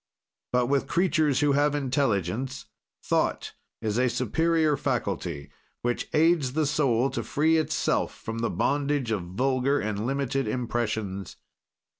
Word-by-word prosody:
"But 125 0 +2
with 135 +2 +1
creatures 160 -6 +2
who 145 -1 +3
have 145 +1 +2
intelligence, 130 - -1 0.4
thought - - 0 0.3
is 110 +1 0
a 130 0 +3
superior 160 +6 +1
faculty, 95 - -3 0.3
which 120 0 -1
aids 155 -4 +3
the 155 +1 +1
soul 135 -3 +2
to - - -2
free 160 +2 +2
itself 155 - 0
from 115 +1 -6
the 115 - 0
bondage 140 -4 0
of 105 -4 0
vulgar 130 +9 0
and 105 +1 -2
limited 135 -1 -1
impressions. 110 -5 -2
130 Hz, 130 wpm, -27 LUFS, 115-145 Hz, 0.4 s, who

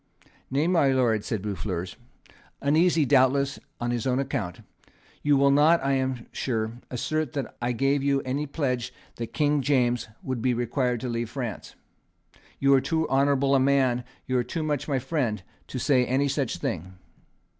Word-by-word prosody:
"Nay, 140 +4 +1
my 170 -5 +3
Lord," 120 -5 +2
said 105 -4 -3
Boufflers, 95 -3 -4 0.6
uneasy 160 +2 +3
doubtless 140 +1 +3 0.2
on 120 0 -1
his 120 0 -2
own 125 -1 +1
account, 120 -10 -3 0.6
"you 145 -1 +3
will 140 0 +4
not; 155 +4 +5
I 140 - +2
am 130 -3 -1
sure, 115 -2 -2
assert 155 +3 -2
that 140 -4 -4
I 120 +1 0
gave 135 +3 +1
you 140 0 +2
any 140 +3 -2
pledge 130 -5 -2 0.3
that 115 -1 -5
King 150 -1 +2
James 125 -3 +1 0.2
would 130 -3 -3
be 125 +1 +1
required 120 0 -1
to 130 - -3
leave 115 -1 -2
France. 125 -5 -6 0.8
You 140 0 +4
are 135 - +5
too 160 +2 0
honourable 140 0 +3
a 135 - +5
man, 130 -2 +2 0.2
you 130 -1 +1
are - - +1
too 160 +6 -4
much 150 -3 -2
my 140 -3 +1
friend, 125 - -1 0.2
to - - -6
say 130 0 +3
any 130 +3 +1
such 140 -3 -1
thing." 90 +2 -4
130 Hz, 170 wpm, -26 LUFS, 120-140 Hz, 0.8 s, not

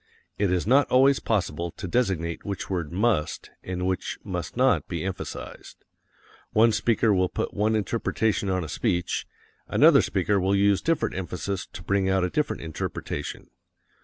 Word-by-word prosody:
It 100 -3 +2
is 90 -1 +1
not 135 +6 +4
always 135 +2 +5
possible 85 -6 -1
to - - -6
designate 85 -6 -1
which 100 -1 -5
word 85 -5 -2
must, 100 -4 0
and 90 0 -4
which 95 -1 -2
must - - -5
not - - +3
be - - -4
emphasized. - - -7 0.7
One 115 +2 +5
speaker 110 0 +2
will 90 -1 +2
put - - -3
one 105 +2 +1
interpretation 105 -2 0
on 95 -1 0
a - - -5
speech, 85 +3 -1 0.4
another - - +6
speaker 105 -1 +1
will 95 +2 +2
use 100 0 +3
different 165 -1 0
emphasis 95 +1 -4
to 90 - -8
bring 100 0 +1
out 95 -1 +2
a 90 - -1
different 150 - -1
interpretation. 80 -2 -5
95 Hz, 160 wpm, -26 LUFS, 90-110 Hz, 0.7 s, another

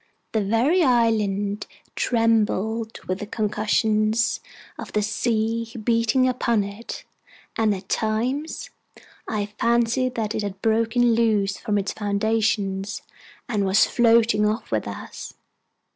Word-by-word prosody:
The 220 - +1
very 240 - +2
island 215 - +1 0.3
trembled 225 -1 0
with 185 +1 -2
the 210 - -6
concussions 215 +1 +1 0.4
of - - -7
the 210 - +1
sea 225 +2 -1
beating 235 +3 +2
upon 235 -4 +1
it, 200 +4 -7 0.5
and 220 -1 +2
at 190 0 -10
times 245 +10 -2 0.6
I 210 -2 -1
fancied 235 +2 +1
that 215 -2 -2
it - - -2
had 200 -2 -5
broken 230 +2 +2
loose 215 -4 +1
from 210 -1 -1
its 200 -1 -2
foundation, 205 -2 0 0.6
and 210 -4 0
was 195 +2 +4
floating 230 -3 +3
off 215 +2 -3
with - - -1
us. - - -8
220 Hz, 120 wpm, -23 LUFS, 205-230 Hz, 0.6 s, was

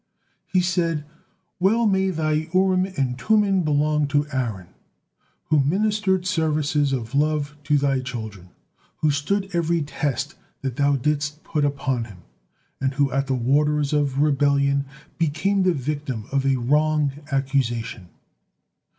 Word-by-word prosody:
He 185 -1 +2
said: 170 -4 0 0.5
"Well 220 +6 +3
may 190 -2 +2
Thy 155 -2 -1
Urim 185 0 +3
and 130 -2 -1
Tummim 205 - +3
belong 150 -1 +1
to 145 +1 +1
Aaron, 115 -9 -3 0.8
who 155 -1 +4
ministered 190 +3 +1
services 150 -4 +1
of 120 -2 -3
love 150 0 0
to 150 -1 +3
Thy 140 -1 +1
children, 110 -8 -7 0.5
who 155 - +2
stood 195 +8 -1
every 170 -1 +1
test 145 -1 -2 0.3
that 135 -2 -3
Thou 145 0 +3
didst 150 +2 -1
put 150 - -1
upon 140 -4 -1
him, 95 -6 -14 0.6
and 135 0 -1
who 140 -1 +2
at 135 +1 0
the 135 - 0
'waters 145 +4 +1
of 145 -3 +1
rebellion' 140 -1 +2 0.3
became 170 +6 +1
the 185 -1 +3
victim 140 -6 -3
of 135 0 +1
a 135 - +3
wrong 150 +3 +2 0.2
accusation." 125 -8 -1
145 Hz, 135 wpm, -23 LUFS, 135-160 Hz, 0.8 s, who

